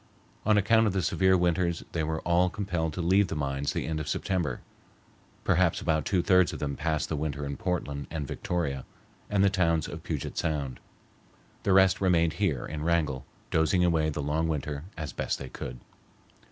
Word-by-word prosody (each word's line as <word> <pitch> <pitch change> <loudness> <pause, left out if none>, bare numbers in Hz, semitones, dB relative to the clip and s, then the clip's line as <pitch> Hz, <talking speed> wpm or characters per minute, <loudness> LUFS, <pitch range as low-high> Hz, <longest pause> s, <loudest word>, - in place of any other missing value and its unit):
On 110 -1 +5
account 110 +2 +4
of 100 - 0
the 95 -2 0
severe 95 +2 +3
winters 85 -1 +1
they 80 - -1
were 80 +1 -2
all 85 +1 +3
compelled 90 -5 -2
to 90 - -3
leave 95 +3 +4
the 80 - -4
mines 70 -1 -1
the - - -2
end 80 -1 -2
of 75 - -5
September. 90 -2 -1 0.8
Perhaps 90 -1 +3
about 80 -2 0
two 90 -3 +1
thirds 90 -4 +4
of - - -4
them 70 -1 -3
passed 80 0 -1
the 80 - -2
winter 75 -1 -3
in 70 0 -3
Portland 70 -4 -3
and 80 -3 -3
Victoria 70 -7 -2 0.5
and 100 -1 +3
the 100 - +6
towns 85 -5 +2
of - - -7
Puget - - -4
Sound. 70 -5 -2 0.8
The 100 - +2
rest 95 0 +5
remained 85 -4 +3
here 75 -11 +1
in 75 -1 -5
Wrangell, 80 -6 0 0.2
dozing 85 +3 +3
away 80 -3 +2
the 75 -1 -3
long 80 +3 0
winter 75 -1 -3
as 80 -3 -5
best - - -2
they 70 - -7
could. 60 0 -7
80 Hz, 190 wpm, -28 LUFS, 75-90 Hz, 0.8 s, the